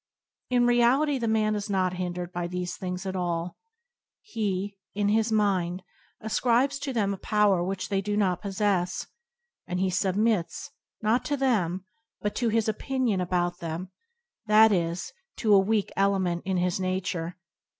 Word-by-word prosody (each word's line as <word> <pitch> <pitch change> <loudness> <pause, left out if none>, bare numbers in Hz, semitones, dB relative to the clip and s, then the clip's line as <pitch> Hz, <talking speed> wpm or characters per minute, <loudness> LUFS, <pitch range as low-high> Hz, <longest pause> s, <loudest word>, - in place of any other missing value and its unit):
In 245 -1 +3
reality 255 +4 +3
the 230 - -1
man 215 -1 +2
is 210 0 -3
not 185 -2 +1
hindered 180 -1 -4
by 175 0 -2
these 180 0 -4
things 180 0 -5
at 190 0 -3
all. 175 -1 -2 0.7
He, 205 - -2 0.2
in 205 0 +1
his 220 +1 +2
mind, 190 -4 +1 0.4
ascribes 245 +5 +1
to 280 -1 -3
them 205 -5 0
a - - -5
power 205 -3 +2
which 190 +1 -3
they 195 -1 +1
do 205 +1 -2
not 185 -4 +1
possess, 195 -3 0 0.6
and 180 0 -2
he 190 0 +1
submits, 195 -1 0 0.3
not 220 +4 +2
to 290 - 0
them, 190 -9 0 0.3
but 210 - -2
to 240 -2 +1
his 225 0 +1
opinion 230 -2 0
about 175 0 -1
them, 170 +3 -5 0.6
that 215 +1 +7
is, 175 -2 -1 0.2
to 215 -2 +2
a 200 - +8
weak 205 +1 +1
ele 195 0 +3
ment 175 -2 -1
in 190 -1 0
his 180 +1 0
nature. 185 -2 -2
195 Hz, 160 wpm, -27 LUFS, 180-220 Hz, 0.7 s, a